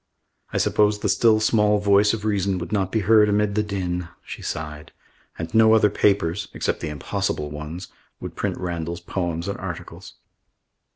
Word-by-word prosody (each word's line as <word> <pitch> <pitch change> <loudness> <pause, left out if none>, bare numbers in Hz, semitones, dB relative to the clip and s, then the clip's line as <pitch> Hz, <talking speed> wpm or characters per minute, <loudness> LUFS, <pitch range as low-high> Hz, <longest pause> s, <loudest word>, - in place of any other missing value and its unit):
"I - - -2
suppose 105 0 +2
the - - -2
still 110 -2 +4
small 105 -1 +3
voice 100 0 +4
of 110 -2 -4
reason 100 -2 0
would 90 +3 -6
not 95 -3 0
be 110 - +1
heard 105 +1 +5
amid 105 0 +1
the 105 - +1
din," 90 -4 -3 0.2
she - - -8
sighed. 75 -1 -6 0.5
"And 80 0 -6
no 110 0 +6
other 105 -2 +4
papers 100 -2 +1
except - - -1
the 80 - -4
impossible 75 0 -3
ones 75 +5 -7 0.3
would - - -7
print - - -2
Randall's 85 -1 -4
poems 85 -1 -3
and 100 - -4
articles." - - -8
100 Hz, 170 wpm, -23 LUFS, 85-105 Hz, 0.5 s, no